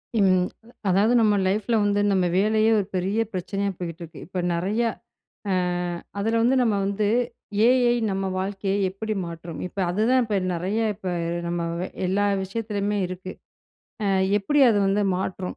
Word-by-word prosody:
ம். 185 -4 +3 0.4
அதாவது, 200 +6 +3
நம்ம 210 -2 +4
லைஃப்ல 210 +4 0
வந்து 205 0 +2
நம்ம 190 -2 +2
வேலையே 215 +2 +3
ஒரு 200 - -1
பெரிய 195 +5 0
பிரச்சனையா 195 +2 -2
போய்கிட்டு 170 -1 -6
இருக்கு. 165 - -10
இப்ப 185 0 -3
நெறையா 210 +7 0 0.6
அ - - +2 0.7
அதுல 225 +3 +1
வந்து 250 +3 +3
நம்ம 225 -4 +2
வந்து 200 +1 0 0.6
ஏ. - - +6 0.2
ஐ. - - +4 0.2
நம்ம 195 0 -2
வாழ்க்கையை 195 +1 -2
எப்படி 215 +3 -4
மாற்றும்? 170 -1 -7
இப்ப 195 - -15
அதுதான் 230 +7 +2
இப்ப 210 -3 0 0.2
நெறைய 190 +6 -1
இப்ப 190 -2 -4 0.4
நம்ம 170 -1 -2 0.4
எல்லா 200 +3 +1 0.2
விஷயத்துலயுமே 205 0 -2
இருக்கு. 185 +1 -7 0.7
அ - - +1 0.3
எப்படி 290 +9 +1
அது 210 - +2
வந்து 200 +1 +2
மாற்றும்? 185 0 -4
200 Hz, 150 wpm, -24 LUFS, 185-215 Hz, 0.7 s, ஏ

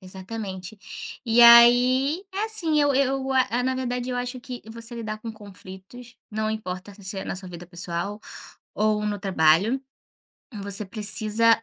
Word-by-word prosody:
exatamente. 190 +1 -7 0.5
E, 235 +1 +5
aí, 250 +8 +6
é 400 +3 -1
assim 335 -9 0
eu 285 -1 +2
eu 270 0 0
a 250 -1 +1
na 260 0 0
verdade, 250 -1 -3
eu 250 - -2
acho 250 +1 -3
que 250 -2 -8
você 230 +1 -7
lidar 215 -2 -5
com 225 0 -7
conflitos, 205 +3 -13 0.2
não 215 0 -2
importa 200 -2 -5
se 200 - -16
você 190 +1 -4
é - - -5
na - - -4
sua 185 -1 -5
vida 175 0 -10
pessoal 175 +4 -5 0.5
ou 210 0 +1
no 205 -2 -3
trabalho, 190 +6 +3 0.7
você 200 0 -1
precisa 215 +2 +2
220 Hz, 160 wpm, -24 LUFS, 195-250 Hz, 0.7 s, aí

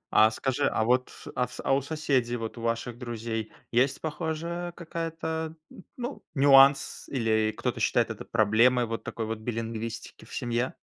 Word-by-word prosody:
А 110 0 +8
скажи, 125 +3 0
а 110 - +1
вот, 125 +2 +2 0.2
а 125 -1 +1
в - - -12
а - - +2
у 140 - +3
соседей, 135 -5 0
вот 115 0 -5
у - - -7
ваших 115 +1 -2
друзей 115 -2 -4 0.2
есть 130 +3 +2
похожая 170 +2 -3
какая-то 160 -1 -4 0.2
н 190 - -13
ну 245 +3 -5
нюанс 135 0 +6
или 110 -4 +1
кто-то - - -2
считает - - +2
это - - -7
проблемой 120 +3 +4
вот 115 0 -4
такой 115 - -4
вот 110 0 -4
билингвистики 115 0 -5
в - - -10
семье? 120 +1 -1
125 Hz, 165 wpm, -28 LUFS, 115-155 Hz, 0.2 s, А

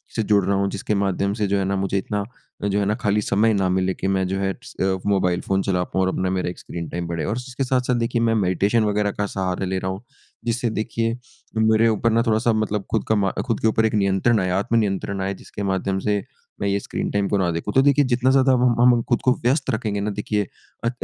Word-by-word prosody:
से 110 - +1
जुड़ 105 -2 +3
रहा 100 +1 +1
हूँ 100 0 +1
जिसके 100 +2 -2
माध्यम 100 0 0
से 105 - +1
जो 100 +1 +1
है 95 - 0
ना 100 +1 0
मुझे 95 0 -1
इतना 100 +1 -2 0.4
जो 100 0 +1
है 100 - +1
ना 105 +2 +1
खाली 105 -3 0
समय 110 +2 +2
ना 95 -2 +1
मिले 95 0 +1
कि 95 - -4
मैं 95 -1 +1
जो 95 +1 -2
है 95 0 0
स - - -11
अ, 95 0 +1
मोबाइल 90 -3 +1
फ़ोन 95 0 0
चला 90 -3 0
पाऊँ 95 - -2
और - - +1
अपना 95 - -1
मेरा 90 -1 -1
एक 90 - -8
स्क्रीन 85 -1 -6
टाइम 85 0 -4
बढ़े। 85 -2 -3
और 105 - -1
उसके 125 +2 -4
साथ-साथ 125 -1 +1
देखिए 115 0 0
मैं 115 -1 +2
मेडिटेशन 100 +3 +2
वगैरह 105 -1 +1
का 105 - -2
सहारा 95 -1 -2
ले 95 +1 -1
रहा 95 0 -2
हूँ, 95 +4 -7 0.4
जिससे 120 +1 0
देखिए, 115 +1 -2 0.4
मेरे 110 +1 +4
ऊपर 115 +1 +1
ना 115 +1 +3
थोड़ा-सा 110 +1 +2
मतलब 105 -2 -1
खुद - - +1
का - - +4
म 100 -2 +1
खुद 115 -5 -1
के - - +2
ऊपर 110 0 +2
एक 110 - 0
नियंत्रण 100 +3 +2
आए 90 - -1
आत्म 110 +3 -1
नियंत्रण 100 -2 -1
आए 95 +1 -1
जिसके 100 +1 -8
माध्यम 95 0 -1
से 105 -1 0 0.4
मैं 100 - 0
ये 100 0 +1
स्क्रीन - - -4
टाइम 100 -1 0
को 100 - +1
ना 90 -2 +1
देखूँ। 85 +5 -3
तो 135 - +5
देखिए 140 +1 +4
जितना 125 +1 +2
ज़्यादा 135 -1 +4
ब 125 - +1 0.2
हम 125 0 +6
हम 120 - +1
खुद 120 - +2
को 125 - +3
व्यस्त 135 +3 +1
रखेंगे 110 -4 -1
ना 105 - -1
देखिए 105 0 -2 0.4
अ, 115 - +2
100 Hz, 260 wpm, -22 LUFS, 95-115 Hz, 0.4 s, हम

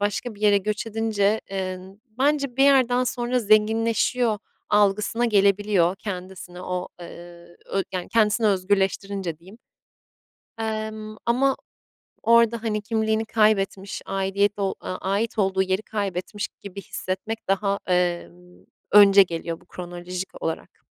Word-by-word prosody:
başka 205 +3 -2
bir 205 - -17
yere 205 -1 +5
göç 210 +3 -3
edince, 220 -1 0
eee, 185 -1 -3 0.4
bence 280 -2 +1
bir 270 - +5
yerden 255 -3 +4
sonra 245 0 -1
zenginleşiyor 220 +1 +2 0.3
algısına 210 +3 +2
gelebiliyor. 200 -4 +3
Kendisini 185 -2 -7
o, 180 0 -3
eee, 175 0 -12
ö 195 - -1
yani 180 -1 -4
kendisini 220 0 +2
özgürleştirince 195 -2 0
diyeyim. 190 +7 -16 1.0
Emm, 215 -1 -4
ama 265 +3 +2 0.7
orada, 235 0 +4
hani, 210 -2 -1
kimliğini 220 0 0
kaybetmiş, 200 -3 +1
aidiyet 195 +2 0
ol 195 -1 0
aaa, 185 - -5
ait 205 +4 -2
olduğu 190 -1 +2
yeri 190 +2 0
kaybetmiş 200 -1 -4
gibi 200 0 -8
hissetmek 190 +5 -5
daha, 200 +1 +1
emm, 180 0 -2 0.3
önce 200 -1 +8
geliyor 165 -1 -5
bu - - -22
kronolojik 180 +1 -6
olarak. 165 - -5
205 Hz, 125 wpm, -24 LUFS, 185-220 Hz, 1.0 s, önce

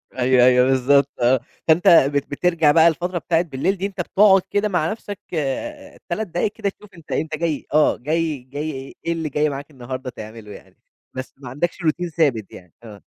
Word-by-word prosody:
أيوه 125 -1 +4
أيوه، 125 0 +5
بالضبط، 135 +2 +3
آه. 125 +2 +4 0.3
فأنتَ 160 +2 +3
بت 140 -3 +4
بترجع 165 0 +2
بقى 160 +2 +6
الفترة 175 +2 -1
بتاعة 165 -1 +1
بالليل 165 +3 -1
دي، 190 - -3
أنتَ 200 -2 -4
بتقعد 195 +2 +4
كده 205 +1 0
مع 175 -4 0
نفسَك، 205 -2 -7
آآ، 285 - -4
3 210 +5 -2
دقايِق 175 +4 -1
كده، 205 -1 -2
تشوف 210 +1 -15
أنتَ 165 -3 -14
أنتَ 155 0 -2
جاي 160 -2 -2
آه، 150 0 +4
جاي 155 +3 -1
جاي 140 0 -6
إيه 170 - 0
اللي 160 -2 -3
جاي 150 +2 +1
معاك 140 +1 -7
النهارده 130 -1 -6
تعمله 110 -2 -10
يعني. - - -14 0.4
بس 130 0 -7
ما 135 -2 -10
عندَكش 150 +7 -2
routine 170 +2 0
ثابِت 125 - +1
يعني؟ 90 -3 -14
آه. 105 -4 -12
155 Hz, 190 wpm, -21 LUFS, 130-175 Hz, 0.4 s, بقى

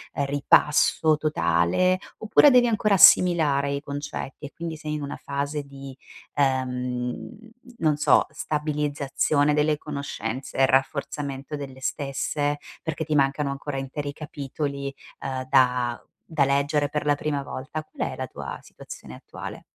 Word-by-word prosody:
ripasso 145 +2 +3
totale, 150 - +2 0.2
oppure 220 +6 +5
devi 250 -1 +6
ancora 215 -2 +2
assimilare 155 -6 +6
i 140 0 -2
concetti 145 -1 -6
e - - -16
quindi 165 -1 -5
sei 155 -1 -5
in 150 - -4
una 140 - -5
fase 145 +1 -3
di, 140 -1 -10 0.4
ehm, 125 -2 -1 0.4
non 155 -7 +2
so, 150 - +4
stabilizzazione 150 -1 0
delle 150 0 +2
conoscenze 140 -4 -5
e 135 - +6
rafforzamento 140 +1 -1
delle 135 -2 -7
stesse, 145 +2 -2 0.2
perché 160 0 -3
ti 155 0 -1
mancano 140 +1 +2
ancora 140 0 -5
interi 140 +2 -4
capitoli, 140 -1 -5 0.3
ehm, 130 -1 -4
da 125 -3 +2 0.2
da 155 -4 +1
leggere 145 +1 +1
per 150 +1 -2
la 145 - +4
prima 145 -1 -2
volta? 135 +4 -6
Qual - - -4
è - - -6
la - - -4
tua - - -7
situazione - - -11
attuale? - - -9
145 Hz, 135 wpm, -25 LUFS, 135-150 Hz, 0.4 s, devi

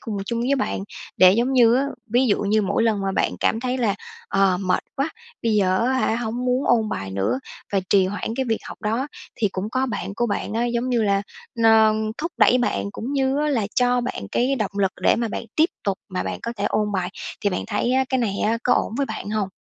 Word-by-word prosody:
cùng 215 -2 -5
chung 235 +1 -2
với 255 +4 +2
bạn. 260 - -1 0.4
Để, 185 0 +7
giống 240 +6 +1
như 240 -3 +6
á, 270 +3 +2 0.2
ví 245 +4 +2
dụ 210 - +2
như 210 +1 +2
mỗi 200 - +1
lần 220 -3 +2
mà 195 0 -1
bạn - - 0
cảm 225 - +1
thấy 255 +1 -1
là, 220 -5 +1 0.3
ờ, 195 -2 +3
mệt 185 -2 0
quá, 275 +3 0 0.3
bây 230 -2 +1
giờ 190 -2 +3
á 260 - +2
hả 260 -3 +1
hông 240 +1 -3
muốn 255 +2 +1
ôn 225 -3 +3
bài 95 - -4
nữa 100 +6 0 0.3
và 195 - +2
trì 195 -2 +5
hoãn 205 +3 -3
cái 265 - 0
việc 225 - +1
học - - -9
đó, 230 +6 0 0.3
thì 215 - +1
cũng 190 +3 -3
có 260 +2 0
bạn 220 -4 -4
của 240 - +1
bạn 205 - -2
á, 230 +2 0
giống 240 +1 -1
như 240 -3 +2
là, 200 -1 +2 0.4
ơ, 220 -1 +6 0.3
thúc 335 +2 -3
đẩy 250 - +5
bạn, 240 -4 -1
cũng 245 +7 -5
như 270 0 +1
á 300 - +1
là 235 -8 +1
cho 245 0 +3
bạn 240 - -4
cái 255 +3 +2
động 210 -4 -2
lực 195 -2 +2
để - - +4
mà 230 -1 -1
bạn - - -4
tiếp 320 +3 +4
tục 195 -2 -1
mà 185 -2 -2
bạn - - -4
có 235 - -4
thể 200 - -2
ôn 210 -1 0
bài. 185 -2 -1 0.3
Thì 205 - +1
bạn 180 - -2
thấy 230 +3 0
á, 265 +1 +3
cái 260 - +1
này 225 -5 0
á 225 +2 +1
có 245 - +4
ổn - - 0
với 280 -1 0
bạn 205 - -5
hông? 210 -3 -1
225 Hz, 255 wpm, -23 LUFS, 200-250 Hz, 0.4 s, Để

